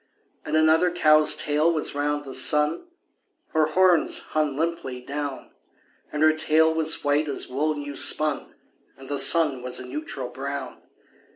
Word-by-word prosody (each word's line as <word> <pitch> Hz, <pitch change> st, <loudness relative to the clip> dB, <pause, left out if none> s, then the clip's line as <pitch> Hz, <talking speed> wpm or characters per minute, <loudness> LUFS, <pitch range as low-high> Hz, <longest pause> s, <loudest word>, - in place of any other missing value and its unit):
And 150 Hz, -, -3 dB
another 160 Hz, +3 st, +3 dB
cow's 155 Hz, -3 st, +4 dB
tail 150 Hz, +3 st, +1 dB
was 155 Hz, -2 st, -2 dB
round 145 Hz, 0 st, -2 dB
the 135 Hz, -, -8 dB
sun 150 Hz, -, +1 dB, 0.6 s
(Her 155 Hz, -1 st, +1 dB
horns 180 Hz, +1 st, +2 dB
hung 150 Hz, -3 st, -1 dB
limply 160 Hz, -6 st, -3 dB
down); 140 Hz, +1 st, -6 dB, 0.6 s
And 150 Hz, +1 st, -1 dB
her 155 Hz, 0 st, +5 dB
tail 160 Hz, +1 st, +2 dB
was 160 Hz, 0 st, 0 dB
white 145 Hz, +1 st, +1 dB
as 140 Hz, -, -4 dB
wool 150 Hz, +4 st, -1 dB
new 145 Hz, -1 st, -7 dB
spun, 150 Hz, +1 st, +1 dB, 0.4 s
And 135 Hz, 0 st, -13 dB
the 145 Hz, -1 st, 0 dB
sun 150 Hz, -6 st, +3 dB
was 125 Hz, 0 st, -4 dB
a 130 Hz, -, -8 dB
neutral 135 Hz, -1 st, -6 dB
brown. 135 Hz, 0 st, -7 dB
150 Hz, 155 wpm, -24 LUFS, 140-155 Hz, 0.6 s, her